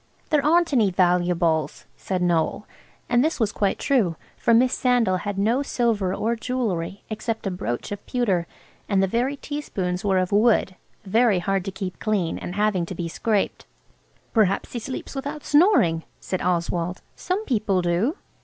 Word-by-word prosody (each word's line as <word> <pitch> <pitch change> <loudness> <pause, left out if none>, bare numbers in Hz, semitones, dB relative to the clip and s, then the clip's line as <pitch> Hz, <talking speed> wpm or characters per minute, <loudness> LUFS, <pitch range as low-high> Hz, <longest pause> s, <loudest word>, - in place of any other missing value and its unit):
"There 300 -2 +3
aren't 335 +1 +3
any 225 -6 +4
valuables," 175 -4 +1
said 185 -2 -2
Noël, 175 +3 +1 0.4
and 240 +1 +3
this 315 -1 0
was 220 -3 +1
quite 200 -2 0
true, 225 - +1 0.2
for - - +1
Miss 250 +2 +4
Sandal 245 -7 +2
had 200 +2 -4
no 225 +7 +2
silver 230 -8 0
or 225 +4 0
jewellery 215 -7 -3
except 220 +1 -3
a 195 - -1
brooch 120 - -4
of 205 0 -5
pewter, 195 -9 0 0.4
and 195 -2 +3
the - - +5
very 245 +8 0
teaspoons 195 -12 -4
were 195 -2 +2
of 185 -1 0
wood–very 215 0 +2
hard 195 +1 0
to 195 - -3
keep 190 -1 -6
clean 200 -6 -1
and 180 - -6
having 205 -5 +1
to 185 - -6
be 170 0 -3
scraped. 205 +4 -1 0.7
"Perhaps 200 -4 +2
he 240 - -3
sleeps 255 +3 -6
without 285 +2 -5
snoring," 290 - +4 0.2
said 185 - -3
Oswald, 175 0 -1
"some 380 +5 -2
people 205 -7 +1
do." 185 - +1
205 Hz, 165 wpm, -24 LUFS, 180-245 Hz, 0.7 s, the